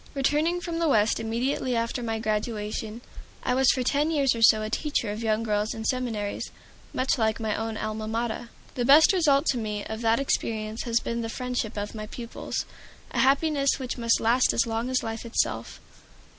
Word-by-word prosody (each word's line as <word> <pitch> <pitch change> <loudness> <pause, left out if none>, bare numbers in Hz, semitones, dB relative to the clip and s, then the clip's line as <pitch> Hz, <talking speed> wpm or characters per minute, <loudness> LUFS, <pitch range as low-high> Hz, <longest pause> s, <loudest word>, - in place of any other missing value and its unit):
Returning 300 +5 +1
from 340 -2 -4
the 335 - +2
West 215 -4 +3
immediately 240 +3 -1
after 230 +2 -1
my 225 -1 -2
graduation, 215 0 -3 0.4
I 250 - +1
was 265 0 +4
for 255 - +2
ten 290 +4 +1
years 285 -5 +2
or 230 - -5
so 215 -1 +6
a 215 - -3
teacher 285 -6 -1
of 210 +2 -5
young 220 0 +1
girls 210 -1 -1
in 220 0 -6
seminaries 225 -5 -2 0.4
much 255 0 0
like 220 0 +1
my 220 -2 -1
own 225 0 -3
Alma 215 0 -4
Mater. 230 +1 -3 0.2
The 245 - -1
best 290 +8 +7
result 300 -5 +3
to 250 - -2
me 210 -2 -3
of 220 +1 -5
that 230 +1 +3
experience 220 -4 -2
has 235 -1 +2
been 235 0 -3
the 225 - -4
friendship 245 -3 -3
of 205 0 -4
my 215 -1 -6
pupils, 235 +1 -5 0.5
a - - -2
happiness 280 +1 +3
which 255 -2 -5
must 230 -1 +3
last 240 +3 +3
as 235 - +2
long 230 +2 -2
as 260 -1 0
life 225 0 -4
itself. 235 -1 -2
230 Hz, 195 wpm, -26 LUFS, 220-260 Hz, 0.5 s, best